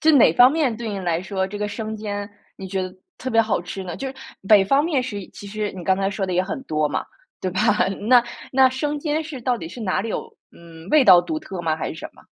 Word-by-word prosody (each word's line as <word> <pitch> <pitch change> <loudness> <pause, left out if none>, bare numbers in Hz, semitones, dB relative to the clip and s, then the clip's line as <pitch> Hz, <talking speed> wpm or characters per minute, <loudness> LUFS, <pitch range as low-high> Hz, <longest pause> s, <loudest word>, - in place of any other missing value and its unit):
就 315 - +5
哪 235 - +6
方 245 +7 +7
面 285 -7 0
对 230 0 -5
你 200 -2 -3
来 175 -2 -1
说， 190 -1 -2
这 205 +1 -7
个 210 - -2
生 215 +1 -5
煎 205 -1 -4 0.3
你 195 - -7
觉 190 0 -2
得 185 0 -6 0.2
特 260 - -4
别 225 - +5
好 215 -5 0
吃 185 +2 -6
呢？ 175 -2 -6
就 270 - -4
是 265 - -8 0.3
北 205 -3 +7
方 275 +9 +3
面 295 -6 +1
食 205 -6 -5
其 200 - -10
实 210 0 -3
你 180 -3 -8
刚 190 0 +3
才 195 0 0
说 195 -1 -2
的 185 - -3
也 180 - +2
很 195 +8 -4
多 155 -5 0
嘛， 145 - -2 0.4
对 185 - -2
吧？ 185 - -2 0.5
那 250 -2 +7 0.3
那 265 0 +6
生 290 +3 -2
煎 310 +1 -1
是 295 -4 -7
到 245 0 0
底 165 -7 -7
是 235 - -10
哪 195 -4 0
里 225 - -4
有 - - -5 0.2
嗯， 165 0 -14
味 305 -3 +6
道 180 -5 +8
独 315 - -3
特 190 - -7
吗？ 160 -2 0
还 - - -3
是 - - -6
什 160 - -8
么？ - - -20
205 Hz, 290 characters per minute, -22 LUFS, 185-255 Hz, 0.5 s, 道